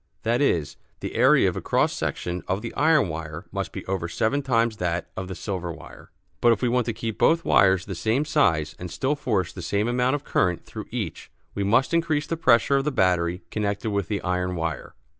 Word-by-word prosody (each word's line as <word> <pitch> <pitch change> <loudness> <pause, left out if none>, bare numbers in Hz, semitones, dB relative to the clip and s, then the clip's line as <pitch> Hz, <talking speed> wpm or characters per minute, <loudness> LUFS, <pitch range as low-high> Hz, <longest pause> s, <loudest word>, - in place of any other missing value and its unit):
That 120 +3 +1
is, 85 - +1 0.2
the - - -5
area - - +5
of - - -1
a - - -4
cross - - +1
section 90 0 -3
of 95 +4 -1
the 115 - -5
iron 155 -4 +3
wire 80 +1 -6
must - - -3
be - - -7
over 95 -3 -2
seven 110 +11 0
times 115 -4 +1
that 90 -2 -2
of 95 - -5
the 95 - -6
silver 90 -1 -4
wire. - - -12 0.3
But 120 - +6
if 115 - 0
we 125 - +3
want 125 0 +1
to - - +1
keep 115 -1 -5
both 165 +1 +3
wires 95 -1 +4
the 100 - -5
same 115 - 0
size 90 - +1
and 90 - -6
still 135 - -1
force 105 - -1
the 90 - -7
same 100 +5 0
amount 125 +3 +1
of 145 - -5
current 90 - 0
through - - -8
each - - -5 0.2
we 100 - -2
must 115 +10 +2
increase 160 -3 +1
the 165 - -2
pressure 130 -2 +4
of 135 - +1
the 150 - +1
battery 90 -6 +1
connected 105 0 -2
with 100 -3 -1
the 105 -2 -3
iron 90 0 -1
wire. 80 -4 -4
105 Hz, 220 wpm, -25 LUFS, 90-130 Hz, 0.3 s, But